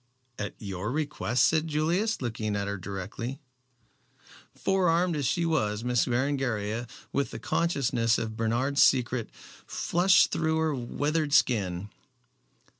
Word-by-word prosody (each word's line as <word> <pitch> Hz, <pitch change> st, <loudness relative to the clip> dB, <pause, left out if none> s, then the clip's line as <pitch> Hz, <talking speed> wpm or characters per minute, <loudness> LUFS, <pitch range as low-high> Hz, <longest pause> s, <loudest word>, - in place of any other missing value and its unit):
"At 105 Hz, -1 st, -4 dB
your 100 Hz, +1 st, -4 dB
request?" 145 Hz, -4 st, +1 dB
said 160 Hz, 0 st, +2 dB
Julius, 165 Hz, +6 st, 0 dB
looking 110 Hz, -3 st, -2 dB
at 100 Hz, 0 st, -2 dB
her 100 Hz, -1 st, -3 dB
directly. 100 Hz, +8 st, -5 dB, 1.2 s
Forearmed 180 Hz, -2 st, +2 dB
as 145 Hz, -4 st, 0 dB
she 170 Hz, +5 st, +1 dB
was, 115 Hz, -10 st, 0 dB
Miss 125 Hz, -1 st, +2 dB
Berengaria, 120 Hz, -4 st, -1 dB, 0.3 s
with 140 Hz, -1 st, 0 dB
the -, -, -7 dB
consciousness 120 Hz, -8 st, +1 dB
of 110 Hz, -1 st, -4 dB
Bernard's 120 Hz, +5 st, +1 dB
secret, 125 Hz, -2 st, +3 dB, 0.4 s
flushed 180 Hz, +2 st, +3 dB
through 160 Hz, 0 st, 0 dB
her 160 Hz, -1 st, +1 dB
withered 145 Hz, +4 st, -1 dB
skin. 100 Hz, -, +2 dB
130 Hz, 120 wpm, -28 LUFS, 110-155 Hz, 1.2 s, secret